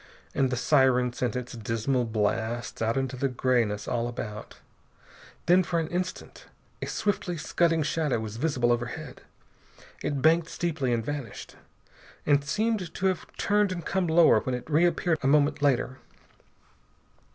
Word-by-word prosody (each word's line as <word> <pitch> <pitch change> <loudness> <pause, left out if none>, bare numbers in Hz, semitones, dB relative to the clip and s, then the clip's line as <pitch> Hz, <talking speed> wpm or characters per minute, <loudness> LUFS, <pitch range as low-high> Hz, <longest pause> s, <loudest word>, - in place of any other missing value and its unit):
And 135 -1 +2
the 125 - -2
siren 125 -2 +3
sent 125 -1 -2
its 125 -1 -4
dismal 115 +3 -1
blasts 110 +2 -2
out 115 +3 +1
into 130 -1 -1
the 135 +2 0
grayness 120 -5 0
all 120 -1 -1
about. 105 -3 -7 0.9
Then, 180 +2 +5
for 170 -1 -1
an 160 -1 -3
instant, 180 +1 -5 0.3
a - - -3
swiftly 190 -4 -1
scudding 165 0 +1
shadow 150 -4 0
was 110 0 -6
visible 125 -4 +1
overhead. 120 +4 -3 0.8
It 145 -2 -2
banked 165 +1 +4
steeply 155 -7 -1
and 115 -2 0
vanished, 145 -7 -6 0.7
and 145 -1 +3
seemed 210 +2 -1
to 190 - -2
have 185 -4 0
turned 205 -1 +2
and 175 -2 -5
come 190 -2 0
lower 165 +1 +6
when 130 -3 -2
it 125 - -7
reappeared 165 +1 +2
a 135 - 0
moment 145 +1 +3
later. 130 -2 +1
140 Hz, 150 wpm, -27 LUFS, 120-165 Hz, 0.9 s, lower